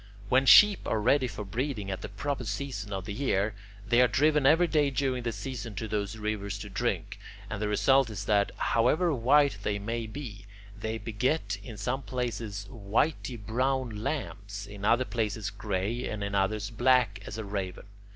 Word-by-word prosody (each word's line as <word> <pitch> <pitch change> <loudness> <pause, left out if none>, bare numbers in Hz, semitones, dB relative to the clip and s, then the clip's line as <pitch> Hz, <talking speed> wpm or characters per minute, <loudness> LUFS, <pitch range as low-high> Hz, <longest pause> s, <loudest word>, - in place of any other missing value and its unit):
When 130 +1 +4
sheep 210 -1 +8
are 110 - +1
ready 130 +4 +3
for 105 -3 -6
breeding 110 -1 -3
at 95 - -4
the - - -6
proper 130 +6 -3
season 110 -1 -4
of 95 -1 -4
the 100 - -4
year, 105 -4 0 0.3
they 120 +2 +5
are 125 - +6
driven 145 +3 +3
every 165 +5 +6
day 150 -4 +2
during 130 -2 -1
that 115 -1 -2
season 115 0 -6
to 110 - -4
those 105 0 -2
rivers 105 -2 -3
to 105 +1 -8
drink, - - -2 0.3
and 105 - -4
the 105 - 0
result 115 +5 +3
is 100 -2 -5
that, 100 -1 +3
however 155 +9 +2
white 140 -1 +3
they 100 0 -1
may 115 +2 -3
be, 110 -5 -8 0.3
they 110 +2 -3
beget 110 +1 -1
in 105 +1 -9
some 125 +7 -2
places 115 -6 -4
whity 120 +4 -1
brown 130 +4 -1
lambs, 100 -9 -4
in 100 0 -7
other 120 +4 +3
places 110 -3 -2
gray, 105 +3 -2
and 105 -1 -4
in 100 0 -3
others 100 +2 0
black 125 +1 +3
as 105 - -6
a 110 - -4
raven. 100 -2 -4
110 Hz, 180 wpm, -29 LUFS, 100-130 Hz, 0.3 s, sheep